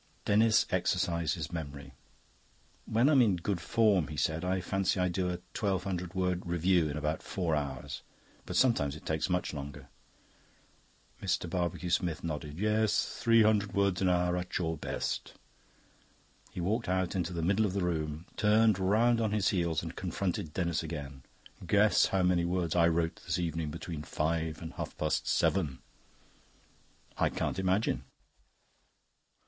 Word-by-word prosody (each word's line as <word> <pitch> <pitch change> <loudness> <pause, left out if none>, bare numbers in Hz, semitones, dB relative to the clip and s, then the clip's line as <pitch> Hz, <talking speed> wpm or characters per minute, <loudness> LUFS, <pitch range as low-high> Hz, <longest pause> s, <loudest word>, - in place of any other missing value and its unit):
Denis 110 +1 +4
exercised 85 -3 +1
his 80 -2 -5
memory. 70 -4 -6 0.9
"When 115 +4 +2
I'm 145 -3 +6
in 105 -6 +4
good 90 +1 -2
form," 105 -6 +3
he 75 - -7
said, 80 +4 0
"I 95 +1 0
fancy 95 +1 0
I 90 0 +2
do 90 +1 -1
a 90 - -2 0.2
twelve 95 -4 0
hundred 90 -2 -4
word 90 -1 0
review 85 -1 +2
in 75 - -4
about 75 +1 -2
four 85 -4 -2
hours. 70 -3 -4 0.5
But - - -4
sometimes 75 - +3
it 75 - -12
takes 80 +2 -1
me - - +1
much 90 - -1
longer." 70 -1 -7 1.3
Mr. 95 -2 0
Barbecue 90 0 -2
Smith 85 -2 0
nodded. 75 -2 -4
"Yes, 105 +2 +1
three 115 -1 +5
hundred 105 -2 +2
words 100 -2 +2
an 95 - +3
hour 90 0 +2
at 90 0 -3
your 80 -2 -1
best." 75 - -4 1.1
He - - -8
walked 105 +5 -1
out 95 0 0
into 90 -2 -1
the 85 -2 -3
middle 100 +5 +2
of 95 - -4
the 100 -2 -1
room, 80 -2 -2
turned 105 -1 +4
round 115 +5 +3
on 110 -2 0
his 105 -2 +2
heels, 85 -4 0
and 85 0 -6
confronted 90 -3 -3
Denis 85 -4 0
again. 70 -5 -6 0.4
"Guess - - +4
how 95 -1 +1
many 90 -1 +3
words 85 -1 -1
I 85 -1 +5
wrote 85 0 0
this - - -1
evening 80 -3 -2
between 80 0 -6
five 80 +2 -2
and 80 - -7
half - - -6
past 75 0 -1
seven." 80 -9 +1 1.4
"I - - +3
can't - - -2
imagine." 95 +3 0
90 Hz, 160 wpm, -31 LUFS, 80-95 Hz, 1.4 s, I'm